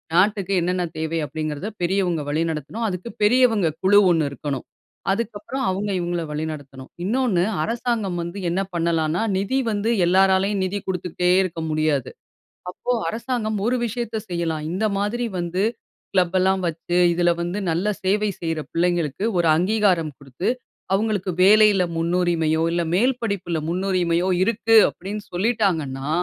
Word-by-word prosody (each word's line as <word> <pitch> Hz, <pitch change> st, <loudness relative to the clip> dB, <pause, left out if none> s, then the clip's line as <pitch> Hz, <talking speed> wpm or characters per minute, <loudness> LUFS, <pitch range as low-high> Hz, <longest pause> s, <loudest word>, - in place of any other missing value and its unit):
நாட்டுக்கு 195 Hz, +1 st, +2 dB
என்னென்ன 180 Hz, +1 st, 0 dB
தேவை 160 Hz, +1 st, -2 dB
அப்படிங்கிறதை 155 Hz, +4 st, -4 dB
பெரியவங்க 175 Hz, -2 st, +1 dB
வழிநடத்தணும். 160 Hz, +7 st, -2 dB
அதுக்கு 185 Hz, +3 st, -4 dB
பெரியவங்க 225 Hz, -5 st, +4 dB, 0.2 s
குழு 205 Hz, +2 st, +6 dB
ஒண்ணு 160 Hz, -4 st, +2 dB
இருக்கணும். 140 Hz, -1 st, -5 dB, 0.5 s
அதுக்கப்பறம் 230 Hz, +5 st, -3 dB
அவங்க 195 Hz, +2 st, -2 dB
இவங்கள 175 Hz, -1 st, -2 dB
வழிநடத்தணும். 145 Hz, -4 st, -6 dB
இன்னொன்னு 215 Hz, -4 st, +1 dB, 0.2 s
அரசாங்கம் 225 Hz, -5 st, -1 dB
வந்து 170 Hz, +4 st, -6 dB
என்ன 185 Hz, +3 st, 0 dB
பண்ணலாம்ன்னா 165 Hz, 0 st, 0 dB, 0.2 s
நிதி 200 Hz, +7 st, 0 dB
வந்து 210 Hz, +1 st, -1 dB, 0.2 s
எல்லாராலயும் 190 Hz, +2 st, +3 dB
நிதி 190 Hz, +2 st, -2 dB
குடுத்துக்கிட்டே 180 Hz, -1 st, 0 dB
இருக்க 165 Hz, -3 st, -4 dB
முடியாது. 155 Hz, -4 st, 0 dB, 0.6 s
அப்போ 245 Hz, +6 st, -4 dB, 0.2 s
அரசாங்கம் 225 Hz, -2 st, -2 dB
ஒரு 245 Hz, +2 st, +2 dB
விஷயத்தை 230 Hz, -1 st, -3 dB
செய்யலாம். 165 Hz, -3 st, -2 dB
இந்த 195 Hz, +5 st, -1 dB
மாதிரி 220 Hz, +4 st, -1 dB
வந்து 175 Hz, +2 st, -2 dB, 0.5 s
கிளப் 185 Hz, -1 st, +2 dB
எல்லாம் 190 Hz, 0 st, +2 dB
வச்சு 170 Hz, +2 st, -2 dB, 0.2 s
இதில 175 Hz, 0 st, +2 dB
வந்து 175 Hz, +4 st, -2 dB
நல்ல 175 Hz, +6 st, 0 dB, 0.2 s
சேவை 205 Hz, +2 st, +1 dB
செய்ற 165 Hz, -1 st, -2 dB
பிள்ளைங்களுக்கு 175 Hz, -1 st, 0 dB
ஒரு 170 Hz, -1 st, +2 dB
அங்கீகாரம் 185 Hz, -4 st, +1 dB
குடுத்து 140 Hz, -, -4 dB, 0.4 s
அவங்களுக்கு 200 Hz, -2 st, 0 dB
வேலையில 210 Hz, -1 st, +6 dB
முன்னுரிமையோ 165 Hz, -2 st, +1 dB
இல்ல 170 Hz, 0 st, 0 dB
மேல் 245 Hz, +7 st, +3 dB
படிப்பில 200 Hz, -6 st, -2 dB
முன்னுரிமையோ 180 Hz, -1 st, 0 dB, 0.2 s
இருக்கு 225 Hz, +1 st, +2 dB
அப்படின்னு 205 Hz, +3 st, -6 dB
சொல்லிட்டாங்கன்னா, 175 Hz, -, 0 dB
180 Hz, 130 wpm, -22 LUFS, 165-210 Hz, 0.6 s, குழு